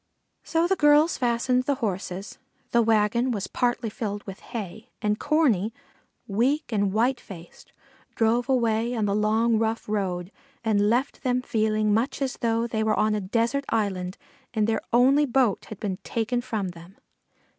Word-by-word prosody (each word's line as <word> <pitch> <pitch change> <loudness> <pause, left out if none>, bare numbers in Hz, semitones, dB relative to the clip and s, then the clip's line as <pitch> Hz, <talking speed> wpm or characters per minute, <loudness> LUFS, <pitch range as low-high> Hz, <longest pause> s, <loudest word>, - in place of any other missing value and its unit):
So 330 0 +1
the 385 +2 +2
girls 295 +1 +4
harnessed 250 +1 +1
the 285 - +2
horses; 195 -5 -4 0.3
the 235 - +4
wagon 225 +2 +2
was 205 -5 -2
partly 240 -2 -1
filled 205 -3 -4
with 195 -1 -9
hay, 220 0 -7
and 210 -1 0
Corney, 260 - +2 0.5
weak 245 +9 0
and 200 -3 +1
white 240 +5 +1
faced, 175 -7 -13 0.4
drove 235 +3 +1
away 235 -2 +1
on 220 -2 0
the 200 - 0
long 220 +2 +2
rough 225 0 -1
road, 190 -3 -2 0.3
and 210 -2 +2
left 250 +5 0
them 250 -1 0
feeling 215 -4 +1
much 230 +6 0
as 270 -2 -2
though 230 0 0
they 220 -2 -1
were 215 -1 +1
on 215 0 +2
a 210 - -1
desert 230 +8 0
island 190 -4 -1 0.4
and 215 -1 +2
their 220 0 0
only 270 +5 +4
boat 245 -5 +1
had 215 - -9
been 195 -3 -3
taken 235 +4 -2
from 220 -6 -3
them. 175 +3 -13
225 Hz, 165 wpm, -25 LUFS, 210-245 Hz, 0.5 s, girls